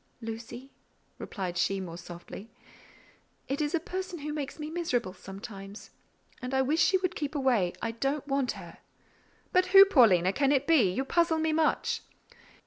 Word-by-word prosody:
"Lucy," 235 Hz, +3 st, -8 dB, 0.5 s
replied 180 Hz, -4 st, -4 dB
she 195 Hz, +1 st, +1 dB
more 175 Hz, -3 st, -6 dB
softly, 175 Hz, +5 st, -10 dB, 1.0 s
"it 275 Hz, +3 st, -2 dB
is 295 Hz, +2 st, 0 dB
a -, -, +1 dB
person 365 Hz, +2 st, -5 dB
who 300 Hz, 0 st, -5 dB
makes 290 Hz, -3 st, -5 dB
me 300 Hz, -1 st, -5 dB
miserable 250 Hz, -, -1 dB
sometimes; 195 Hz, +1 st, -10 dB, 0.5 s
and 250 Hz, +1 st, -3 dB
I 265 Hz, -, +3 dB
wish 305 Hz, +5 st, +1 dB
she 375 Hz, -, +4 dB
would 370 Hz, -1 st, -2 dB
keep 295 Hz, 0 st, -4 dB
away—I 230 Hz, -6 st, 0 dB
don't 275 Hz, +5 st, -2 dB
want 275 Hz, -2 st, 0 dB
her." -, -, -11 dB, 0.7 s
"But 365 Hz, 0 st, +4 dB
who, 390 Hz, -, +12 dB
Paulina, 200 Hz, -, +4 dB
can 275 Hz, +3 st, +2 dB
it 280 Hz, -1 st, +2 dB
be? 280 Hz, -, +4 dB
You 265 Hz, +9 st, -2 dB
puzzle 335 Hz, +2 st, +2 dB
me 315 Hz, 0 st, 0 dB
much." 315 Hz, 0 st, +1 dB
265 Hz, 160 wpm, -29 LUFS, 200-315 Hz, 1.0 s, who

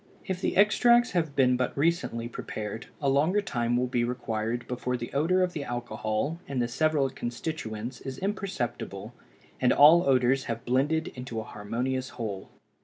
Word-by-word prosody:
If 185 Hz, -1 st, -3 dB
the -, -, -1 dB
extracts 240 Hz, +4 st, +5 dB
have 160 Hz, -6 st, -1 dB
been 125 Hz, -2 st, +4 dB
but 125 Hz, -, -2 dB
recently 145 Hz, -7 st, 0 dB
prepared, 110 Hz, -1 st, -6 dB
a 140 Hz, -, -1 dB
longer 150 Hz, +9 st, +3 dB
time 120 Hz, -, 0 dB
will 125 Hz, -, +1 dB
be 120 Hz, -1 st, 0 dB
required 120 Hz, -1 st, -2 dB
before 125 Hz, 0 st, -2 dB
the 120 Hz, 0 st, -7 dB
odor 170 Hz, +6 st, +3 dB
of 180 Hz, -1 st, -1 dB
the 150 Hz, -, -3 dB
alcohol 120 Hz, +4 st, -3 dB
and 135 Hz, -2 st, -2 dB
the 120 Hz, -, +1 dB
several 150 Hz, +3 st, +1 dB
constituents 120 Hz, -2 st, -5 dB
is 135 Hz, -1 st, -6 dB
imperceptible 125 Hz, -, -4 dB, 0.5 s
and 125 Hz, -, +3 dB
all 155 Hz, +4 st, +8 dB
odors 130 Hz, +1 st, +3 dB
have 115 Hz, +1 st, -4 dB
blended 145 Hz, +6 st, +1 dB
into 125 Hz, -3 st, -6 dB
a -, -, -4 dB
harmonious 125 Hz, +5 st, -3 dB
whole. 105 Hz, -5 st, -5 dB
125 Hz, 165 wpm, -28 LUFS, 120-155 Hz, 0.5 s, all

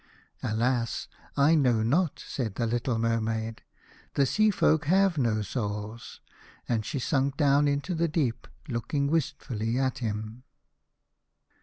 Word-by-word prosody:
" -, -, -44 dB
Alas! 115 Hz, +2 st, 0 dB, 0.3 s
I 145 Hz, +3 st, +5 dB
know 125 Hz, -8 st, +3 dB
not," 155 Hz, +8 st, +1 dB
said 115 Hz, -7 st, -3 dB
the 115 Hz, -, 0 dB
little 120 Hz, +1 st, 0 dB
Mer 115 Hz, 0 st, +1 dB
maid: 110 Hz, 0 st, -3 dB, 0.5 s
"the 140 Hz, -, +4 dB
Sea 215 Hz, -, +3 dB
folk 160 Hz, -5 st, +2 dB
have 185 Hz, 0 st, +3 dB
no 110 Hz, -4 st, +1 dB
souls." 105 Hz, 0 st, -5 dB, 0.5 s
And 115 Hz, -3 st, 0 dB
she 120 Hz, -, -4 dB
sank 135 Hz, +1 st, 0 dB
down 145 Hz, -1 st, +4 dB
into 145 Hz, +5 st, -1 dB
the 170 Hz, 0 st, +1 dB
deep, 150 Hz, -8 st, -1 dB, 0.2 s
looking 140 Hz, +3 st, -1 dB
wistfully 130 Hz, -8 st, -1 dB
at 130 Hz, 0 st, 0 dB
him. 110 Hz, 0 st, -4 dB
125 Hz, 140 wpm, -28 LUFS, 115-145 Hz, 0.5 s, I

